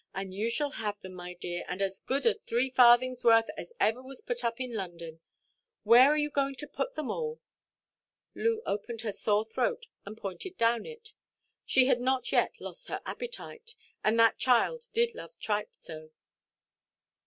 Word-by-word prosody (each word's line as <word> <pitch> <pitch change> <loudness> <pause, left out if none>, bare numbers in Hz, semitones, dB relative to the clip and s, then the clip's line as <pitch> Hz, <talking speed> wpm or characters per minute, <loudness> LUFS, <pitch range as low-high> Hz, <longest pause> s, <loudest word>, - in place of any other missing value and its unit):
And 190 0 -4
you 210 +4 -1
shall 290 +4 0
have 210 -4 -4
them, 185 0 -9
my 180 0 -8
dear, 175 0 -5
and 180 - -4
as 195 -1 -1
good 270 +2 -1
a 460 - +6
three 260 - -1
farthings' 250 0 +5
worth 225 -1 +5
as - - -8
ever 225 +4 +2
was 260 0 -8
put 245 0 -3
up 230 0 -1
in 255 -2 -4
London. 170 -5 -6 0.6
Where 250 +4 +8
are 300 - +3
you 295 0 0
going 275 -1 0
to 295 +3 -7
put - - -4
them 305 -3 -3
all?" 470 0 -3 0.9
Loo 455 0 0
opened 220 +3 -3
her 225 -3 -2
sore 210 +1 +1
throat, 475 - -1 0.2
and 210 +2 -9
pointed 225 - -6
down 230 0 +2
it. 460 -2 -11 0.5
She 260 -1 +5
had 245 -2 +2
not 255 -1 0
yet - - +1
lost - - -7
her - - -4
appetite; 470 -2 -7 0.3
and 220 +2 +2
that 230 0 +5
child 365 - +2
did 470 0 +2
love 475 - -10
tripe 210 -1 -2
so. 155 0 -10
240 Hz, 180 wpm, -30 LUFS, 210-295 Hz, 0.9 s, Where